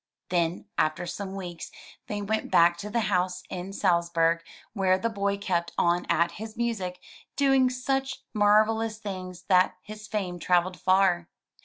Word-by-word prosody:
Then, 170 -1 0
after 155 +3 +1
some 190 +2 -5
weeks, 175 -3 -6 0.4
they 205 -1 -3
went 220 +2 -1
back 170 0 +5
to 210 - -5
the 235 +2 0
home 185 -3 +1 0.2
in 185 +1 -5
Salzburg, 170 -3 +2 0.3
where 190 -3 +2
the 230 +4 -1
boy 200 -1 -1
kept 175 -4 -1
on 175 +1 +2
at 170 0 +2
his 220 +5 -8
music, 210 -7 -2 0.4
doing 270 -2 +4
such 270 +1 -2
mar 210 0 +5
velous 225 0 -2
things 185 -4 -7
that 185 -1 +3
his 210 0 -10
fame 185 -5 -3
traveled 180 +2 +1
far. 185 -2 +3
190 Hz, 155 wpm, -27 LUFS, 175-215 Hz, 0.4 s, back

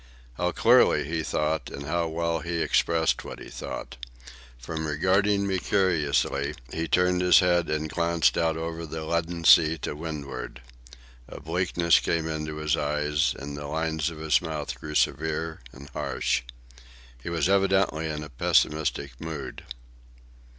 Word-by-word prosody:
How - - -1
clearly 75 - +4
he 80 +1 -2
thought, 80 0 -1
and 70 - -7
how 85 +3 0
well 85 0 -1
he 85 +1 -3
expressed 80 0 +1
what - - -8
he - - -10
thought! - - -7 0.6
From 80 +6 -5
regarding 95 +6 +2
me 95 -1 0
curiously, 75 -6 +1 0.2
he 80 +1 -2
turned 90 +1 +2
his 90 0 +6
head 85 -2 +2
and 75 0 -1
glanced 85 -1 +1
out 80 -1 +1
over 80 0 -5
the 80 +1 -5
leaden 85 +1 -2
sea 80 -1 +6
to - - -3
windward. 70 -6 -6 0.6
A - - -9
bleakness 85 +1 +2
came 80 -1 -1
into 75 -1 -4
his 75 0 0
eyes, 75 0 0
and 70 +1 -7
the 70 0 -6
lines 80 +1 -1
of 85 - -9
his 80 -1 +2
mouth 80 -4 -4
grew 75 -1 -7
severe 80 +2 0
and 70 +3 -12
harsh. - - -1 0.8
He 85 - -6
was 85 -1 0
evidently 95 -5 +2
in 75 -1 -4
a 75 - -9
pessimistic 70 +2 +1
mood. 80 -1 -6
80 Hz, 150 wpm, -26 LUFS, 75-85 Hz, 0.8 s, his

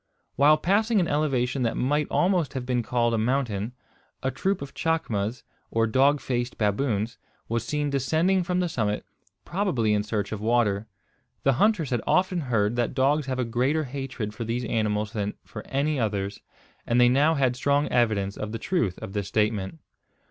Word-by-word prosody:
While 150 +3 +6
passing 210 +6 +2
an 175 - +1
elevation 135 -4 0
that 115 -2 0
might 145 +3 +1
almost 175 -6 +1
have 130 -3 -4
been 125 -1 0
called 120 0 0
a 115 - +1
mountain, 115 -2 -1 0.5
a 130 - 0
troop 195 +7 -1
of 140 - -9
chacmas, 125 -9 -1 0.3
or 115 0 +2
dog 135 +6 +3
faced 120 -2 -3
baboons 110 +1 0 0.3
was 115 0 -1
seen 145 +2 -1
descending 160 +8 +2
from 180 +1 0
the 180 - +1
summit, 105 -9 -1 0.4
probably 155 - 0
in 105 - +2
search 105 -1 -3
of 105 -2 -4
water. 110 -2 +1 0.6
The 135 - +4
hunters 205 - +2
had 120 -3 +1
often 185 -1 +2
heard 115 -6 0
that 120 +1 0
dogs 140 +2 +2
have 130 -1 -2
a 125 - 0
greater 130 +7 +1
hatred 130 -5 -5
for 110 - -5
these 120 +2 -2
animals 105 -1 -1
than 105 -2 -2
for - - -8
any 140 +1 0
others; 100 -3 -2 0.5
and 120 +1 +2
they 125 - +7
now 145 +6 +4
had 130 -3 +2
strong 140 +3 +1
evidence 110 -5 +1
of 105 - -4
the - - -2
truth 115 - -1
of 95 - -6
this 100 -2 -2
statement. 105 -5 0
125 Hz, 180 wpm, -26 LUFS, 110-145 Hz, 0.6 s, they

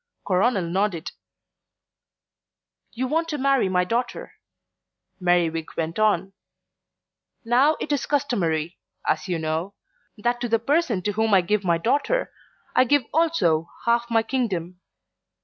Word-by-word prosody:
Coronel 195 +1 +2
nodded. 175 -1 -1 1.8
"You 255 +2 -3
want 325 +4 0
to 300 - -2
marry 275 -6 +2
my 180 -1 +2
daughter," 240 - -3 0.9
Merriwig 170 -3 0
went 165 +3 -2
on. 195 -3 +2 1.1
"Now 260 +7 +3
it - - -4
is 285 -3 -1
customary, 185 - -1 0.3
as - - 0
you 180 -2 -1
know, 160 +5 -3 0.4
that 240 +3 -1
to 240 - -2
the 230 - +3
person 235 - 0
to 210 - 0
whom 220 0 +2
I 190 - +6
give 200 +3 0
my 170 -2 +2
daughter, 285 - 0 0.4
I - - +6
give 285 +1 +3
also 180 - +2 0.2
half 235 0 +2
my 225 -1 +3
kingdom. 185 -9 -2
215 Hz, 130 wpm, -24 LUFS, 175-255 Hz, 1.8 s, I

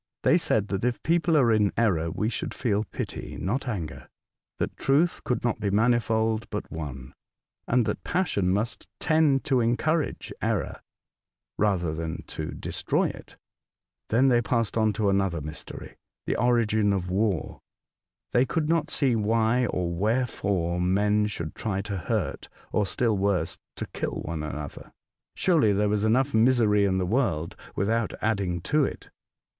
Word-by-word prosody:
They - - +5
said 105 -2 +1
that 95 +2 -2
if 120 -1 -1
people 165 -1 +3
are 125 -5 +4
in 105 -2 +3
error 90 -8 +2
we 105 +6 -1
should 115 - -3
feel 110 -3 0
pity, - - -6
not 125 +8 -2
anger; 90 -10 -5 0.5
that - - -2
truth 150 +6 +2
could 125 - -1
not 120 -2 0
be 100 - 0
manifold, 110 0 +1
but - - -5
one; 70 -5 -6 0.5
and 125 -1 +3
that 105 - -3
passion 160 - 0
must 105 +5 -1
tend 155 -4 +3
to 130 -3 +2
encourage 150 +7 0
error, - - -1 0.7
rather 95 -6 +1
than 80 0 -4
to - - -4
destroy - - -1
it. - - -11 0.7
Then 125 +5 +4
they 120 -2 +4
passed 115 0 0
on 110 -1 +3
to 105 +1 0
another 95 -4 +1
mystery 75 +1 -8
— - - -65
the - - 0
origin 110 -4 +2
of 90 -2 -2
war. 100 -2 0 0.7
They 120 - +4
could 155 +3 -1
not 165 -1 +1
see 135 -6 +2
why 115 +3 +2
or 85 -4 -2
wherefore 100 -4 0
men 105 +3 +2
should 85 -7 -5
try 100 -3 -2
to 100 -1 -4
hurt, 90 - -2 0.2
or, 105 -2 +1
still 115 +3 +1
worse, 100 -1 0 0.2
to - - -4
kill, - - -3
one 80 -1 -4
another. 75 -1 -7 0.4
Surely 160 - +3
there 105 +1 +2
was 105 0 +1
enough 130 +6 +2
misery 110 -3 +4
in 95 -1 +1
the 95 - 0
world 90 - 0 0.2
without 110 +2 0
adding 100 -5 0
to 150 - +2
it - - -4
110 Hz, 160 wpm, -26 LUFS, 95-120 Hz, 0.7 s, They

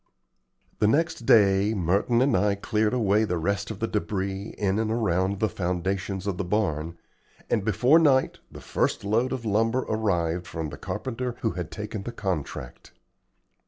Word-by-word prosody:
The 105 - +4
next 145 -2 0
day 100 0 +5
Merton 100 +7 +2
and 140 - +2
I 100 +2 +2
cleared 105 +2 0
away 105 -2 +3
the 90 -5 -1
rest 100 +5 -1
of 110 - -5
the 115 - -1
debris 100 -1 -3
in 100 0 0
and 110 -1 0
around 100 -4 0
the 110 - +2
foundations 95 +1 -2
of 100 -3 -2
the 100 - -1
barn, 85 -4 -1 0.5
and 110 - +2
before 125 - +4
night 135 -5 +3
the - - -10
first - - -1
load 115 +5 +1
of 130 -3 -4
lumber 115 +4 +1
arrived 90 -6 -1
from 80 -3 -4
the - - -8
carpenter 125 -1 -4
who 110 - +1
had 90 -2 -5
taken 105 +1 -5
the 120 - -6
contract. 85 - -5
105 Hz, 165 wpm, -26 LUFS, 95-115 Hz, 0.5 s, day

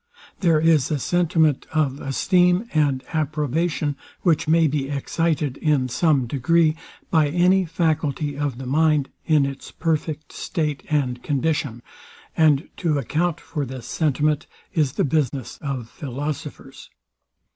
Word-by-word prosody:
There 165 -4 +3
is 155 -4 +3
a 150 - 0
sentiment 160 -2 +1
of 145 -3 +1
esteem 180 - +2
and 145 -4 +2
approbation, 155 0 -1 0.3
which 165 -3 +2
may 165 +1 +4
be 140 -2 -1
excited, 145 0 -1
in 145 -5 +1
some 145 -1 +2
degree, 155 +6 +2 0.4
by 155 -2 +4
any 180 +4 +3
faculty 155 -3 -1
of 145 -4 -2
the 130 - -7
mind, 150 +1 +2 0.2
in 150 -3 +4
its 135 0 -6
perfect 155 -2 -2
state 150 -4 -2
and 130 -5 0
condition; 145 -5 -1 0.5
and 155 -2 +3
to 160 -4 0
account 155 +5 -1
for 150 -3 -4
this 130 -2 -7
sentiment 150 -1 0 0.3
is 150 -5 +1
the - - 0
business 140 -4 -1
of 135 -5 -4
Philosophers. 145 +2 -6
150 Hz, 130 wpm, -23 LUFS, 140-160 Hz, 0.5 s, may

